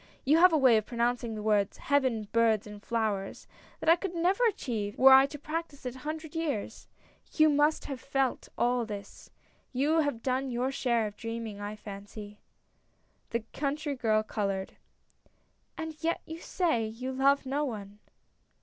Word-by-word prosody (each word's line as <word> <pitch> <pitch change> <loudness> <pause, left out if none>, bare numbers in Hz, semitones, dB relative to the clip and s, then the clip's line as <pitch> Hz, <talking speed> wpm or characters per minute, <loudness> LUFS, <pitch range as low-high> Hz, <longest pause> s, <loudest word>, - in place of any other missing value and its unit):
You 300 +4 +5
have 365 +1 +7
a 320 - +4
way 255 -5 +6
of 215 - -2
pronouncing 235 -1 -1
the 210 - -5
words 210 -2 +1
'Heaven, 260 -7 +1
birds, 225 -2 +3
and 210 -1 -10
flowers 215 -4 -2 0.2
' - - -26
that - - -6
I 330 - +8
could 355 0 -5
never 365 +7 +2
achieve 220 - -3
were 265 +1 +8
I 265 +1 +8
to 295 - -8
practice 305 -1 -5
it 250 - -3
a - - -10
hundred 310 +2 -6
years. 310 -10 -3 0.5
You 310 -1 +5
must 295 +1 +2
have 270 -3 -6
felt 270 -2 -1
all 245 0 +2
this. 205 -3 -8 0.4
You 290 +5 +2
have 285 -7 -1
done 260 +1 0
your 250 +2 -1
share 235 -4 +1
of 210 -1 -6
dreaming, 230 -3 -5
I 205 +1 -5
fancy! 205 0 -9 0.5
" - - -42
The 235 - -1
country 290 +1 -2
girl 220 -4 +2
colored. 195 -3 -3 1.0
"And 320 -1 -5
yet 335 +1 0
you 320 +1 -7
say 330 -10 0
— - - -3
you 245 +4 -5
love 275 +1 +3
no 280 +3 -1
one." 205 -6 -6
250 Hz, 175 wpm, -29 LUFS, 215-295 Hz, 1.0 s, I